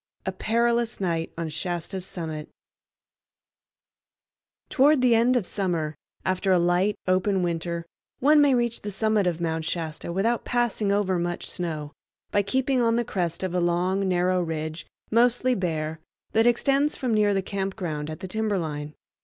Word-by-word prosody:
A - - 0
Perilous 235 +1 0
Night 165 -4 -1
on 165 -1 -2
Shasta's 175 +3 -4
Summit 160 -3 -5 2.2
Toward 290 +2 +4
the 250 -2 +4
end 235 +3 +4
of 220 - -1
summer, 170 -7 -1 0.3
after 185 +1 +1
a 185 - +5
light, 175 +4 +2
open 185 +1 +2
winter, 170 0 -2 0.3
one 295 +3 +5
may 280 -3 +5
reach 240 -1 0
the 205 - -4
summit 215 -1 +1
of 170 -2 -1
Mount 160 -1 -1
Shasta 165 0 -4
without 225 +7 0
passing 235 -4 0
over 195 -3 +1
much 175 0 -3
snow, 155 -4 -3 0.4
by 205 - +3
keeping 260 +5 +1
on 230 -1 +3
the 240 0 +1
crest 175 -3 -2
of 185 -2 -2
a 180 - +1
long 180 +3 +1
narrow 180 0 +2
ridge, 160 -1 -4 0.2
mostly 245 +2 +3
bare, 160 -6 -2 0.3
that 225 +2 +3
extends 275 +4 +2
from 250 -3 -1
near 210 -1 +3
the 195 - 0
camp 195 0 -3
ground 155 -6 -4
at 155 +3 -7
the 190 - -5
timberline. 170 -8 -2
190 Hz, 160 wpm, -25 LUFS, 170-230 Hz, 2.2 s, a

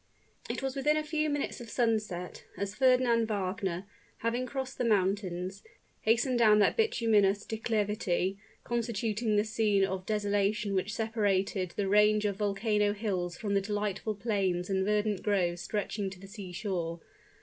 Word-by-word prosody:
It - - -3
was 270 0 -2
within 295 +3 +2
a 310 - 0
few 305 0 0
minutes 290 -3 -2
of 235 - -9
sunset, 215 -8 -1
as 200 0 -3
Fernand 245 -1 +3
Wagner, 190 -3 -2 0.3
having 240 +3 -1
crossed 265 0 -5
the - - +1
mountains, 190 -3 0 0.4
hastened 240 +3 +2
down 215 -2 +6
that 205 - +4
bituminous 215 - +2
declivity 210 -4 -1 0.2
constituting 230 -2 -1
the 205 - +4
scene 215 -3 +2
of 190 0 -4
desolation 205 -1 0
which 195 +3 -1
separated 200 -4 0
the 200 - 0
range 210 +1 +4
of 200 -2 0
volcano 210 0 +1
hills 185 -5 -2
from 205 -2 -2
the 200 - +3
delightful 205 +1 -2
plains 195 -4 -1
and 190 0 +1
verdant 210 -1 +1
groves 175 -4 0
stretching 205 0 -2
to 190 -1 -11
the 195 - -11
sea 195 -2 -8
shore. 175 -4 -3
210 Hz, 150 wpm, -30 LUFS, 195-225 Hz, 0.4 s, down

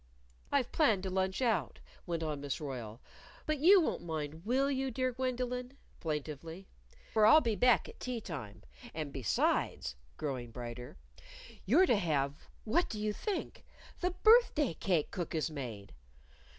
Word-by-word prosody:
"I've 275 -4 +1
planned 225 - +3
to 190 - -3
lunch 190 +5 0
out," 205 - 0 0.3
went 165 -1 -2
on 150 -3 -3
Miss 140 -2 -3
Royle. 125 -7 -6 0.5
"But 310 -2 -1
you 375 +7 +8
won't 335 - 0
mind, 160 -1 -5
will 270 +3 +2
you, 265 0 -1
dear 255 +1 -1
Gwendolyn?" 250 +1 -3 0.2
plaintively. 160 +3 -5 0.5
"For 215 -1 +5
I'll 310 - +9
be 230 -7 0
back 245 +2 +4
at - - -12
tea 250 -2 -3
time. 135 - -7 0.3
And 155 -3 -4
besides" 95 - 0 0.2
growing 130 -5 -3
brighter 120 - -8 0.7
"you're 315 - +6
to 240 - +3
have 145 -6 -1
what 290 +11 +1
do 215 - -5
you 210 0 -1
think! 410 - -4 0.4
the 360 - +1
birthday 370 - +4
cake 165 -2 0
Cook 175 -4 -4
has 155 0 -1
made." 115 -9 -7
190 Hz, 150 wpm, -33 LUFS, -, 0.7 s, I'll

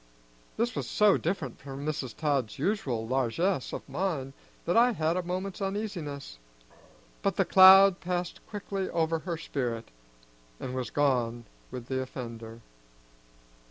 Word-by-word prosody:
This 235 0 0
was - - -3
so 210 -2 +5
different 155 -8 -3
from 140 +1 -7
Mrs. 145 -5 -3
Todd's 140 -8 0
usual 135 - -1
largeness 135 +6 0
of - - -6
mind 155 -8 -2 0.3
that 175 - +1
I 240 +1 +5
had 160 -3 0
a 185 - 0
moment's 185 +3 -4
uneasiness; 180 - -4 0.8
but - - 0
the - - +2
cloud 190 0 +8
passed 180 -1 -3
quickly 200 -2 -4
over 165 -1 0
her 170 0 -4
spirit, 120 -7 -3 0.7
and 125 - -5
was 130 -3 -3
gone 120 -5 0 0.2
with 125 -2 -7
the 130 +1 -2
offender. 115 -3 -7
155 Hz, 135 wpm, -29 LUFS, 130-190 Hz, 0.8 s, cloud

